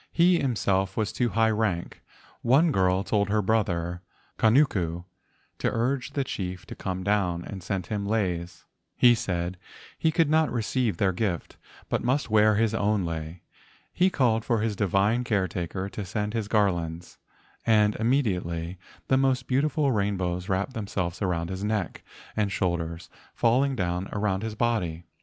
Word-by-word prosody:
He 175 Hz, 0 st, +4 dB
himself 95 Hz, -7 st, 0 dB
was 110 Hz, -2 st, 0 dB
of -, -, -16 dB
too 120 Hz, -1 st, +1 dB
high 110 Hz, 0 st, +2 dB
rank. 105 Hz, -6 st, -2 dB, 0.4 s
One 145 Hz, +7 st, +4 dB
girl 95 Hz, -4 st, +2 dB
told 100 Hz, -1 st, 0 dB
her 105 Hz, 0 st, +2 dB
brother 90 Hz, -5 st, 0 dB, 0.4 s
Kanuku 105 Hz, -, +2 dB, 0.6 s
to -, -, 0 dB
urge 125 Hz, +3 st, -1 dB
the 140 Hz, -, 0 dB
chief 90 Hz, -7 st, -5 dB
to -, -, -9 dB
come 95 Hz, 0 st, -4 dB
down, 90 Hz, -4 st, +1 dB
and 95 Hz, -2 st, -7 dB
sent 95 Hz, 0 st, -3 dB
him 100 Hz, -1 st, -2 dB
leis. 90 Hz, -5 st, -2 dB, 0.3 s
He 120 Hz, -1 st, +6 dB
said 90 Hz, -4 st, -2 dB, 0.4 s
he 160 Hz, -, +2 dB
could 165 Hz, 0 st, +3 dB
not 155 Hz, +1 st, +3 dB
receive 115 Hz, -3 st, 0 dB
their 95 Hz, +1 st, +2 dB
gift, 90 Hz, -2 st, -2 dB, 0.3 s
but -, -, -1 dB
must 130 Hz, -1 st, 0 dB
wear 110 Hz, 0 st, +5 dB
his 110 Hz, 0 st, +2 dB
own 105 Hz, -3 st, +1 dB
lei. 80 Hz, +1 st, -5 dB, 0.5 s
He 185 Hz, +1 st, +3 dB
called 115 Hz, -9 st, +2 dB
for 115 Hz, -3 st, +1 dB
his 110 Hz, -2 st, -1 dB
divine 100 Hz, +5 st, +2 dB
caretaker 95 Hz, -4 st, -2 dB
to 105 Hz, -, -5 dB
send 105 Hz, +3 st, -3 dB
his 110 Hz, -3 st, -2 dB
garlands, 85 Hz, -6 st, -1 dB, 0.4 s
and 105 Hz, -2 st, +4 dB
imme¬ 125 Hz, +7 st, +2 dB
diately 90 Hz, -4 st, -3 dB, 0.3 s
the 130 Hz, -, +3 dB
most 130 Hz, -2 st, +2 dB
beautiful 140 Hz, +2 st, +1 dB
rainbows 95 Hz, -4 st, -1 dB
wrapped 95 Hz, +7 st, -1 dB
themselves 95 Hz, -5 st, -3 dB
around 85 Hz, -2 st, -1 dB
his 95 Hz, +1 st, -4 dB
neck 105 Hz, -5 st, -2 dB, 0.3 s
and 105 Hz, -2 st, 0 dB
shoulders, 85 Hz, -3 st, -2 dB, 0.3 s
fall¬ 120 Hz, +3 st, +4 dB
ing 140 Hz, -1 st, -1 dB
down 90 Hz, -2 st, -2 dB
around 100 Hz, -2 st, 0 dB
his 110 Hz, -1 st, -4 dB
body. 100 Hz, -8 st, -1 dB
105 Hz, 160 wpm, -26 LUFS, 90-115 Hz, 0.6 s, He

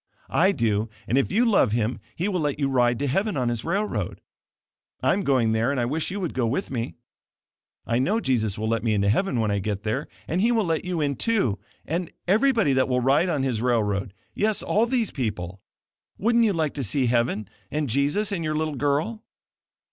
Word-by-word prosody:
I 190 Hz, +4 st, +4 dB
do, 115 Hz, -, 0 dB, 0.2 s
and 120 Hz, -, +1 dB
if 135 Hz, -, +2 dB
you 225 Hz, +6 st, +3 dB
love 195 Hz, -, +3 dB
Him, 115 Hz, +1 st, 0 dB, 0.2 s
He 180 Hz, -, -1 dB
will 190 Hz, -3 st, 0 dB
let 145 Hz, -3 st, -1 dB
you 140 Hz, -2 st, +1 dB
ride 120 Hz, -2 st, +2 dB
to 145 Hz, -, -2 dB
heaven 195 Hz, -, 0 dB
on 125 Hz, -2 st, +1 dB
His 120 Hz, -2 st, -2 dB
railroad. 200 Hz, +5 st, -2 dB, 0.8 s
I -, -, +4 dB
am 205 Hz, -, 0 dB
going 130 Hz, -9 st, +2 dB
there 110 Hz, +3 st, +1 dB
and 140 Hz, -2 st, 0 dB
I 120 Hz, -, +1 dB
wish 150 Hz, +6 st, -1 dB
you 200 Hz, +2 st, -4 dB
would 175 Hz, -5 st, -3 dB
go 125 Hz, -3 st, 0 dB
with 135 Hz, -, -2 dB
me. 120 Hz, -1 st, -3 dB, 0.9 s
I 115 Hz, +1 st, +1 dB
know 200 Hz, -, +1 dB
Jesus 110 Hz, -, 0 dB
will 110 Hz, +1 st, -2 dB
let 115 Hz, -1 st, 0 dB
me 110 Hz, -2 st, +1 dB
into 100 Hz, 0 st, +2 dB
heaven 130 Hz, -, +1 dB
when 110 Hz, -2 st, +1 dB
I 100 Hz, -, +1 dB
get 100 Hz, 0 st, -3 dB
there 115 Hz, +7 st, -2 dB, 0.2 s
and 175 Hz, +4 st, 0 dB
He 230 Hz, +3 st, +3 dB
will 225 Hz, -3 st, +2 dB
let 165 Hz, -2 st, 0 dB
you 180 Hz, -3 st, -2 dB
in, 140 Hz, -2 st, 0 dB
too, 195 Hz, -, +1 dB, 0.3 s
and 170 Hz, +2 st, -2 dB, 0.2 s
everybody 220 Hz, -, +3 dB
that 130 Hz, 0 st, +2 dB
will 125 Hz, 0 st, +2 dB
ride 140 Hz, +8 st, +3 dB
on 145 Hz, -5 st, 0 dB
His 125 Hz, -5 st, -1 dB
railroad 105 Hz, -5 st, 0 dB, 0.2 s
yes, 215 Hz, 0 st, 0 dB
all 225 Hz, +3 st, +2 dB
these 240 Hz, -4 st, 0 dB
people. 100 Hz, -, -4 dB, 0.6 s
Wouldn't 235 Hz, +2 st, +3 dB
you 210 Hz, -, +2 dB
like 160 Hz, -4 st, 0 dB
to 140 Hz, -, -3 dB
see 130 Hz, +4 st, 0 dB
heaven 115 Hz, -4 st, +1 dB, 0.2 s
and 150 Hz, -1 st, -1 dB
Jesus, 145 Hz, -, 0 dB
and 180 Hz, -4 st, -2 dB
your 155 Hz, -1 st, -1 dB
little 155 Hz, -1 st, -1 dB
girl?" 145 Hz, -, 0 dB
140 Hz, 215 wpm, -25 LUFS, 115-185 Hz, 0.9 s, I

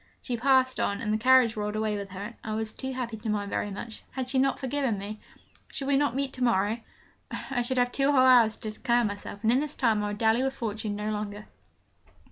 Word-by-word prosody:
She 250 Hz, -, -2 dB
passed 260 Hz, +1 st, +3 dB
on, 200 Hz, 0 st, 0 dB
and 210 Hz, -1 st, -1 dB
the -, -, +2 dB
carriage 255 Hz, -1 st, +5 dB
rolled 210 Hz, 0 st, -3 dB
away 215 Hz, -1 st, 0 dB
with 200 Hz, -1 st, -5 dB
her, 195 Hz, +1 st, -7 dB
and 235 Hz, +2 st, -8 dB
I 215 Hz, 0 st, -3 dB
was 220 Hz, 0 st, -3 dB
too 265 Hz, 0 st, -5 dB
happy 245 Hz, -3 st, -4 dB
to 215 Hz, +1 st, -5 dB
mind 205 Hz, -1 st, -1 dB
very 205 Hz, -, -1 dB
much 215 Hz, +3 st, -7 dB
had 260 Hz, -2 st, -4 dB
she 260 Hz, +1 st, +1 dB
not 270 Hz, +1 st, +2 dB
forgiven 265 Hz, -4 st, -1 dB
me? 205 Hz, +2 st, -6 dB, 0.5 s
Should 275 Hz, -, -5 dB
we 280 Hz, -, +3 dB
not 280 Hz, -3 st, +2 dB
meet 275 Hz, 0 st, -1 dB
to 255 Hz, -, -3 dB
morrow? 220 Hz, -1 st, +2 dB, 0.5 s
I 260 Hz, -3 st, -3 dB
should 255 Hz, +2 st, -1 dB
have 245 Hz, 0 st, +2 dB
two 275 Hz, +2 st, +2 dB
whole 280 Hz, -, +4 dB
hours 240 Hz, -4 st, +6 dB
to 215 Hz, -, -5 dB
declare 240 Hz, +2 st, +1 dB
myself 205 Hz, 0 st, -5 dB
in, 225 Hz, -, +4 dB
and 255 Hz, +3 st, +3 dB
this 300 Hz, 0 st, -3 dB
time 220 Hz, -4 st, +2 dB
I -, -, -1 dB
would 205 Hz, 0 st, -4 dB
dally 225 Hz, +2 st, +3 dB
with 270 Hz, 0 st, -1 dB
Fortune 215 Hz, -3 st, -3 dB
no 210 Hz, +1 st, -2 dB
longer. 210 Hz, 0 st, -4 dB
230 Hz, 245 wpm, -28 LUFS, 210-260 Hz, 0.5 s, hours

